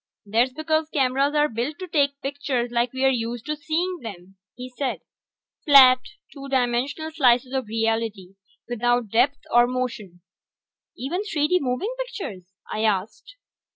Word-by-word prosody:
"That's 230 +5 +2
because 315 +2 -1
cameras 275 0 +1
are 295 0 +4
built 245 +5 -3
to 370 - -7
take 280 -4 +1
pictures 270 -3 -2
like 240 0 +1
we're 265 +1 +2
used 235 -1 -3
to 305 +1 -2
seeing 340 +4 -2
them," 195 -4 -9 0.2
he 250 0 -7
said. 255 +1 -4 0.6
"Flat, 265 -4 +8 0.3
two 275 -1 -9
dimensional 265 +5 -1
slices 255 -3 +3
of 260 -4 -2
reality, 225 -4 -2 0.3
without 240 -1 0
depth 255 +7 +2
or 240 0 +6
motion." 230 -8 -4 0.8
"Even 340 +10 -3
3 310 -8 0
D 360 - +3
moving 280 - -2
pictures?" 210 - -6 0.2
I 215 - -2
asked. 215 - -2
255 Hz, 145 wpm, -24 LUFS, 230-290 Hz, 0.8 s, Flat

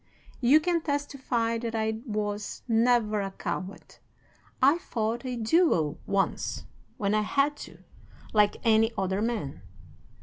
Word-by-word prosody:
"'You 265 +5 +6
can 335 +1 0
testify 265 -6 -1
that 230 -1 -4
I 220 0 -1
was 210 -1 -3
never 225 -2 +2
a 195 - -3
coward. 190 0 -6 0.6
I 280 +6 +5
fought 230 -4 -2
a 250 - -2
duel 225 - +2
once, 195 -1 -1 0.3
when 200 0 0
I 215 - +3
had 280 +7 +1
to, - - -16 0.5
like 210 -1 +3
any 225 0 +4
other 190 0 0
man. 220 -12 -3
225 Hz, 130 wpm, -28 LUFS, 210-250 Hz, 0.6 s, You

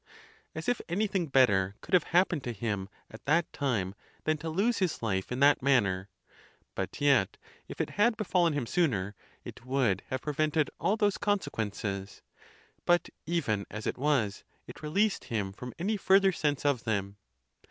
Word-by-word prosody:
As - - -5
if 245 - +1
anything 190 -1 0
better 105 -8 +3
could - - -11
have 180 -3 +5
happened 175 -4 +2
to 120 - -2
him 100 -3 -3 0.2
at 110 - -12
that 165 +4 +2
time 110 -10 -1 0.3
than 155 - +2
to 160 - -4
lose 205 +8 +1
his 180 -10 -1
life 95 -2 -1
in 125 +2 -2
that 145 +1 +5
manner; 100 -8 +2 0.6
but - - -4
yet, 135 -10 +3 0.3
if - - -9
it - - -1
had 225 +1 +4
befallen 180 -6 +2
him 145 -4 -1
sooner, 110 - 0 0.3
it - - -10
would 130 -7 +1
have 130 -1 -3
prevented 155 0 0
all 210 - +1
those 205 -2 +1
con 205 0 +2
sequences; 100 - -4 0.6
but 175 -1 +2 0.2
even 125 -12 0
as 110 0 -6
it - - -2
was, 130 -9 +1 0.2
it - - -11
released 195 +8 +1
him 100 -4 -2
from 125 +5 -7
any) 210 +5 -1
further 195 0 +4
sense 145 -5 -1
of 140 -5 +2
them. 100 -2 -2
140 Hz, 170 wpm, -30 LUFS, 105-175 Hz, 0.6 s, have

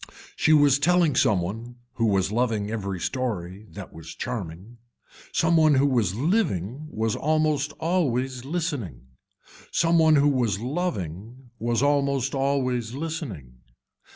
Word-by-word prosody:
She 155 - +2
was 145 -2 +5
telling 170 -1 +3
some 105 -8 +3
one, 115 +7 -6 0.2
who 115 - 0
was 95 -2 +1
loving 110 -3 0
every 100 -4 -3
story 105 -4 -3
that 100 -3 -9
was 80 0 -10
charming. 105 0 -6 0.5
Some 165 0 +2
one 155 -2 +5
who 135 +1 +4
was 115 -9 +1
living 140 - -1
was 110 -4 -1
almost 155 -1 +1
always 135 -7 -1
listening. 140 - -3 0.7
Some 165 0 +3
one 160 -1 +5
who 145 0 +4
was 120 -8 0
loving 120 - -4
was 120 +3 0
almost 140 -2 +1
always 130 -4 0
listening. 130 - -6
125 Hz, 130 wpm, -25 LUFS, 105-145 Hz, 0.7 s, was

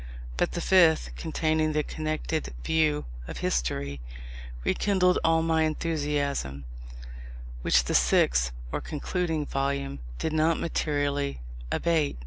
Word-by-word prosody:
But - - 0
the 175 - -2
fifth, 170 -4 +4
containing 155 -1 0
the 150 0 +1
connected 155 - -3
view 155 -2 +2 0.2
of - - -6
history, 70 +2 -1 0.6
rekindled 180 - +2
all 165 0 +3
my 160 -1 +2
enthusiasm; 145 - -1 1.0
which 60 0 +4
the - - -2
sixth - - +3 0.2
(or - - -2
concluding) 160 0 -2
volume 140 - -2 0.2
did 155 - -2
not 155 +1 +2
materially 145 - -1 0.3
abate. 160 - +1
155 Hz, 115 wpm, -27 LUFS, 140-160 Hz, 1.0 s, fifth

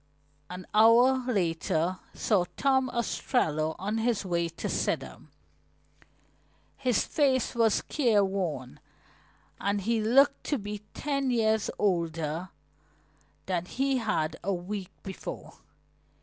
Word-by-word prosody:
An 180 0 -7
hour 240 +4 +5
later 170 -2 0 0.2
saw 195 -5 +2
Tom 265 -1 +2
Ostrello 160 - 0
on 210 +4 -2
his 225 -3 0
way 170 -2 0
to 165 - -5
Sidham. - - -2 1.5
His 250 -5 +1
face 265 -5 +1
was 230 -3 +2
careworn 195 - 0 0.8
and 200 +1 0
he 225 +3 0
looked 275 +6 +4
to 290 - 0
be 205 -1 -5 0.2
ten 275 -2 -1
years 220 -3 +2
older 165 -3 -1 1.0
than 180 -2 -1
he 270 +6 0
had 215 -10 -1
a 200 - 0
week 190 +1 -4
before. 190 - -8
210 Hz, 105 wpm, -28 LUFS, 180-245 Hz, 1.5 s, hour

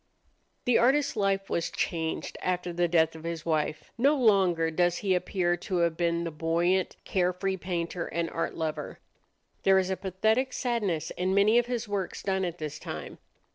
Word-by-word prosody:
The 245 -2 +4
artist's 275 +4 +3
life 195 -2 +1
was 170 - -1
changed 160 -2 -2
after 180 -1 -1
the 175 0 +2
death 160 -1 +3
of 160 - -10
his 165 -1 -4
wife. 155 -1 -1
No 280 +5 +4
longer 190 - +3
does 175 +1 +2
he 190 - +3
appear 180 -1 +1
to 185 +2 -4
have 170 -1 +2
been 170 0 0
the 165 - -3
buoyant, 170 +4 +1
carefree 185 +1 0
painter 175 -1 -3
and 170 0 -2
art 165 - -2
lover. 160 -2 -4 0.6
There 195 0 +5
is 190 0 +1
a - - +1
pathetic 220 +7 0
sadness 210 - -1
in 185 +2 -1
many 210 +4 +5
of 240 - -1
his 245 -2 -2
works 200 -3 -3
done 190 -1 0
at 175 -1 -4
this 155 -1 -5
time. - - -7
180 Hz, 175 wpm, -28 LUFS, 170-195 Hz, 0.6 s, There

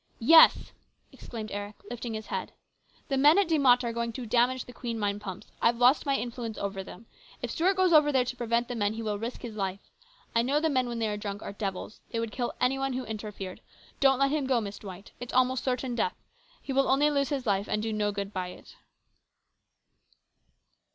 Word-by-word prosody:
" - - -37 0.2
Yes! 320 - +7 0.2
" - - -42
exclaimed 220 -3 -8
Eric, 205 +1 -5
lifting 235 -1 -5
his 215 0 -6
head. - - -4 0.3
" - - -34
The 270 -1 +1
men 295 +5 +6
at 400 -3 +4
De 320 -2 +2
Mott 250 -2 +5
are 235 -1 -2
going 235 0 -2
to 250 +1 -6
damage 245 +3 +2
the 245 - -12
Queen 235 -1 -4
mine 205 -1 -1
pumps. 195 -1 -8
I've 235 0 +3
lost 250 +5 +4
my 275 - +3
influence 235 -2 -4
over 195 -1 -3
them. 220 - -12 0.4
If 240 - -2
Stuart 370 +4 +2
goes 370 -2 +3
over 300 -1 +6
there 260 -3 +2
to 250 - -4
prevent 235 0 0
the 245 - -4
men, 210 -2 0
he 225 +1 -5
will 210 -2 -2
risk 235 +4 -5
his 230 -3 -6
life. 195 -1 -4 0.4
I 230 - +5
know 275 +5 +1
the 320 0 +1
men 255 -2 +1
when 235 - -4
they 225 -1 0
are 210 -1 -2
drunk 205 0 -5
are - - -6
devils. 200 +1 -5
They 230 - -3
would 230 -1 -3
kill 240 +2 -2
any 265 +2 +1
one 270 -1 -1
who 255 0 -3
interfered. 210 -3 -6 0.4
Don't 270 -1 +5
let 275 +1 +2
him 295 -3 0
go, 255 -3 +3
Miss 205 -2 -6
Dwight. 195 -1 -10
It's 245 - -7
almost 255 0 +2
certain 255 -1 -1
death. 455 - 0 0.5
He 270 - -4
will 270 +1 +3
only 290 +3 +4
lose 280 -1 +1
his 275 -3 -2
life 200 -1 +1
and 210 0 -1
do 220 -1 -2
no 210 -1 0
good 200 0 -5
by 185 -1 -2
it." 180 - -13
235 Hz, 230 wpm, -28 LUFS, 210-265 Hz, 0.5 s, Yes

